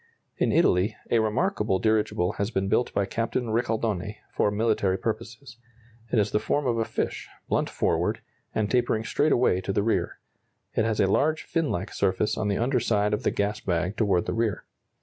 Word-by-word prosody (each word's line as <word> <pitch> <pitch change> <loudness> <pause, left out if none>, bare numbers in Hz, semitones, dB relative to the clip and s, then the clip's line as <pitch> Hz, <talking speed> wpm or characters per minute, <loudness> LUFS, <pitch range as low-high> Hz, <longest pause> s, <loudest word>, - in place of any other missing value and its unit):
In - - +1
Italy 90 +4 +3 0.2
a 115 - +4
remarkable 110 - +1
dirigible 105 -3 +1
has 100 +1 0
been 95 -4 -1
built 110 +5 +1
by 100 - 0
Captain 115 +3 -2
Ricaldoni, 110 -4 -1 0.2
for - - +2
military 105 -3 +1
purposes. 115 +2 -5 0.5
It - - +2
has 105 -1 +2
the 105 - +2
form 145 +5 0
of 120 -2 +1
a 115 - +1
fish, - - -3 0.2
blunt - - 0
forward, - - 0 0.4
and 110 -1 +1
tapering 120 -3 +1
straight 150 +6 +1
away 120 -7 +3
to 95 - -3
the 100 +1 +1
rear. 115 - 0 0.6
It 110 - +1
has 110 -1 0
a - - +5
large 155 +11 +1
finlike 125 - -2
surface 100 +2 +1
on 105 - -1
the 100 - 0
under 125 +2 +1
side 105 -3 +1
of 105 - 0
the - - +1
gas 105 +1 -1
bag 90 +2 -1
toward 100 -6 +1
the - - -2
rear. 115 -4 -1
110 Hz, 190 wpm, -26 LUFS, 100-115 Hz, 0.6 s, a